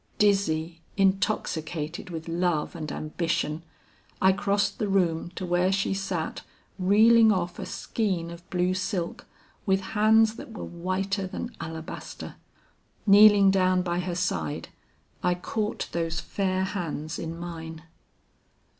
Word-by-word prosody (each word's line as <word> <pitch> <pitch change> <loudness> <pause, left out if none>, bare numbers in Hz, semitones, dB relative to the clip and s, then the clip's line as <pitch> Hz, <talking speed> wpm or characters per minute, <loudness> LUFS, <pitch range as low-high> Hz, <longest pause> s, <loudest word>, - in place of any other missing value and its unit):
Dizzy, 170 -5 +1 0.2
intoxicated 175 -4 0
with 160 -2 -6
love 170 -2 0
and 155 -3 -5
ambition, 155 0 -2 0.6
I 190 - +5
crossed 200 0 0
the 215 - 0
room 175 -4 +1
to 185 - -4
where 175 +1 +2
she 195 0 +1
sat 195 -4 -3 0.4
reeling 220 +4 +6
off 180 -3 -1
a - - -5
skein 185 -7 -2
of 170 +2 -12
blue 180 0 +1
silk 185 -2 -3 0.4
with 190 0 +3
hands 220 +1 +4
that 230 - -9
were 220 - -6
whiter 190 +3 -2
than 240 +6 -6
alabaster. 160 0 -7 0.7
Kneeling 205 -1 +8
down 185 -1 +3
by 175 -1 -1
her 180 -1 -2
side, 85 - -2 0.5
I 180 0 +2
caught 210 +4 -3
those 165 -1 -1
fair 190 +1 -1
hands 165 -4 -4
in 165 0 -5
mine. 165 -2 -7
185 Hz, 130 wpm, -27 LUFS, 165-195 Hz, 0.7 s, Kneeling